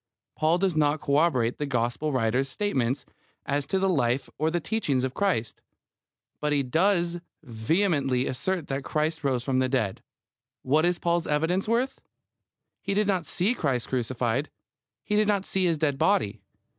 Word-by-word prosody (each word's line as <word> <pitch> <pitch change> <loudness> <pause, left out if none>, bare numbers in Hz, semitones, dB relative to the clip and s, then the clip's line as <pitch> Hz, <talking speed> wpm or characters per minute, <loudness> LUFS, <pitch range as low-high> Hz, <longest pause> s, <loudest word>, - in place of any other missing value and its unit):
Paul 160 +2 +2
does 185 -2 0
not 150 0 +2
corroborate 140 -5 +1
the 150 - -1
Gospel 120 +4 -1
writers' 130 +1 +1
statements 135 - -1 0.4
as 145 0 -1
to 190 - 0
the 190 0 +2
life 135 -7 0
or 155 +1 +2
the 175 +2 0
teachings 155 - 0
of 130 -1 -2
Christ; 170 - -1 0.8
but 150 0 -1
he 145 -1 +2
does 175 +5 +1 0.2
vehemently 135 - +1
assert 175 +5 -2
that 135 0 -3
Christ 155 +3 -1
rose 130 -3 0
from 130 -1 +1
the 130 0 +1
dead. 110 -7 -1 0.6
What 150 +5 +3
is 175 0 +1
Paul's 170 -1 0
evidence 160 +7 +1
worth? 245 +4 0 0.8
He 200 0 -2
did 210 +1 +2
not 190 -5 0
see 195 +7 +1
Christ 135 - -1
crucified. 125 +1 -1 0.5
He 210 - -1
did 210 0 +3
not 200 -2 +1
see 190 -1 0
His 165 -2 +2
dead 145 -3 0
body. 195 - +1
150 Hz, 165 wpm, -26 LUFS, 130-180 Hz, 0.8 s, What